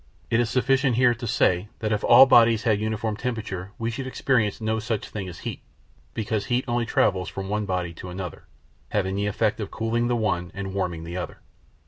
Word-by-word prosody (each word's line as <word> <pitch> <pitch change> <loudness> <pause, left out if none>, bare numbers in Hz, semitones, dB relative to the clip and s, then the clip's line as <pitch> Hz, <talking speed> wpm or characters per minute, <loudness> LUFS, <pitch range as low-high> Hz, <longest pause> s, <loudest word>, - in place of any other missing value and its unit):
It 115 - +3
is 120 -2 +1
sufficient 130 +1 +2
here 120 0 +4
to 120 0 -6
say 95 -4 +2
that 110 -1 -2
if 105 - 0
all 135 - +9
bodies 115 -4 +5
had 110 -4 +2
a - - -6
uniform 110 0 -1
temperature 105 -6 -4
we 115 0 -2
should 130 +3 -5
experience 125 -5 +1
no 110 0 -1
such 110 -2 -3
thing 100 -3 -5
as 85 - -10
heat, - - -5 0.5
because 110 -1 -1
heat 125 +1 0
only 120 -1 0
travels 95 -4 +1
from 95 0 -6
one 105 0 -1
body 90 -3 -2
to 90 +2 -9
another, 90 -2 -7 0.4
having 95 -2 0
the 100 +1 -1
effect 105 +1 0
of 105 -2 -4
cooling 115 +1 -1
the 120 - +1
one 95 -6 -1
and 95 -1 -5
warming 85 -4 -2
the 85 +2 -6
other. 90 - -5
110 Hz, 210 wpm, -25 LUFS, 95-115 Hz, 0.5 s, all